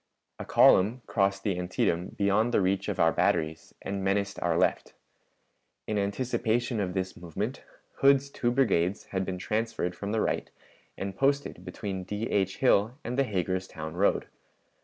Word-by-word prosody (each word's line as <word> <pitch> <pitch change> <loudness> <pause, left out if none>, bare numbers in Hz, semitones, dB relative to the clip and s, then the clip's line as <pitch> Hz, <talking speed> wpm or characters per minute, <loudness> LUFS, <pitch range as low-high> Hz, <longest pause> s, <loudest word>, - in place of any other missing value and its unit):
A - - -5
column 110 +7 +5
crossed 100 -2 0
the 95 -4 -1
Antietam 90 0 0
beyond 100 +4 +2
the - - +3
reach 95 +1 0
of - - -3
our - - +5
batteries 80 0 0
and 100 0 -3
menaced 100 +1 0
our 85 -1 +1
left. - - 0 0.9
In 105 -1 -1
anticipation 115 +2 -1
of 90 -2 -2
this 95 0 -2
movement 100 - -4 0.4
Hood's 140 0 +4
two 120 - 0
brigades 100 -8 +1
had 95 0 0
been 95 -1 -3
transferred 105 -2 -2
from 100 +3 -5
the 110 - +1
right - - -1 0.5
and 95 -1 -4
posted 140 -7 0
between 95 +1 -5
D. 105 +3 -4
H. 95 -1 +1
Hill 120 -1 +3
and 120 - -3
the 140 +1 +2
Hagerstown 95 -5 -3
road. 95 +4 +2
100 Hz, 160 wpm, -28 LUFS, 95-115 Hz, 0.9 s, column